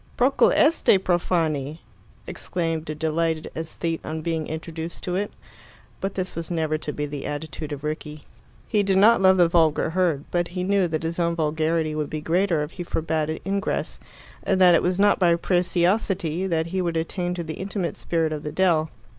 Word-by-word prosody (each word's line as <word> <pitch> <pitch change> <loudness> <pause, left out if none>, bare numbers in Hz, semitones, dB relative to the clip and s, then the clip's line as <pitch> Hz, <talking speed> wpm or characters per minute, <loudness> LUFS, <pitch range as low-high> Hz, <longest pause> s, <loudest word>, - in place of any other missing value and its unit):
"Procul 260 +3 +4
este, 300 -9 +4
profani!" 165 -5 0 0.5
exclaimed 165 -3 -3
a 155 - -3
delighted 160 +1 -1
aesthete 165 +1 -4
on 155 0 -5
being 160 -2 -2
introduced 160 +1 -6
to 180 - -2
it. 205 +2 -1 0.7
But 195 0 -3
this 185 -1 -3
was 165 -1 -5
never 160 -3 0
to 150 - -4
be 150 0 -3
the 145 -1 -5
attitude 145 +1 -5
of 145 -1 -6
Rickie. 150 0 -5 0.4
He 210 - +2
did 195 -1 +2
not 215 +2 +6
love 190 0 +6
the 175 -2 +5
vulgar 160 -2 +2
herd, 170 -5 +1
but 175 -1 +1
he 180 +1 -4
knew 195 -1 +2
that 160 -1 -3
his 165 +2 -3
own 170 -1 +1
vulgarity 160 0 0
would 150 -1 -2
be 155 - -3
greater 170 0 +1
if 150 - -6
he 180 - -6
forbade 160 -2 -1
it 160 - -4
ingress, 195 0 -2 0.4
and 190 - 0
that 180 -2 +7
it 170 - +4
was 180 +1 0
not 205 0 +4
by 175 -3 +4
preciosity 180 0 +1
that 165 -3 0
he 190 - +1
would 170 -2 -1
attain 175 +2 -2
to 175 - -3
the 160 -1 -5
intimate 190 -3 -3
spirit 165 -2 -1
of 150 - -4
the 150 - -5
dell. 160 -2 +2
165 Hz, 195 wpm, -24 LUFS, 155-185 Hz, 0.7 s, that